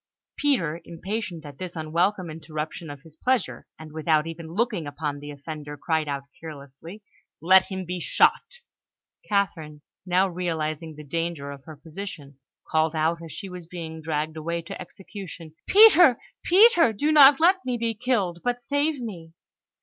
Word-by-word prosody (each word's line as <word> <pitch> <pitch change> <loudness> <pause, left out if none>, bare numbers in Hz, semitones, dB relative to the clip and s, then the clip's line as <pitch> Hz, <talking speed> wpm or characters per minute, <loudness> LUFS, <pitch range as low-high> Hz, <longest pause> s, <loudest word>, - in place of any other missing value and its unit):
Peter, 175 - 0
impatient 180 -1 -5
at 145 -2 -11
this 180 -1 -6
unwelcome 170 +4 0
interruption 155 +1 -6
of 145 -1 -9
his 160 -2 -16
pleasure, 250 +4 -1
and 160 -1 -11
without 155 0 +1
even 165 0 -7
looking 195 -2 -1
upon 145 0 -4
the 145 +1 -9
offender, 145 0 -8
cried 160 +1 -1
out 140 -1 -3 0.2
carelessly: 160 +5 -10 0.4
"Let 185 +4 +6
him 190 -1 -4
be 180 +1 -4
shot!" 485 - +2 0.7
Catherine, 160 -7 -1 0.2
now 185 +1 +2
realising 160 -3 -3
the 150 - -10
danger 165 -1 -3
of 140 -1 -11
her 155 - -10
position, 150 -3 -9 0.3
called 160 0 +1
out 160 +2 0
as 165 - -9
she 200 - -7
was 180 -3 -9
being 165 -2 -7
dragged 155 0 -2
away 170 +2 -3
to 190 +3 -8
execution, 180 -3 -10
"Peter! 360 - +8 0.3
Peter! 355 - +6
Do 290 +9 0
not 285 -2 +8
let 370 +3 +4
me 250 -2 -2
be 230 -1 -1
killed, 210 -7 -1
but 245 0 -1
save 285 +2 0
me!" 175 -9 -8
170 Hz, 155 wpm, -25 LUFS, 155-205 Hz, 0.7 s, Peter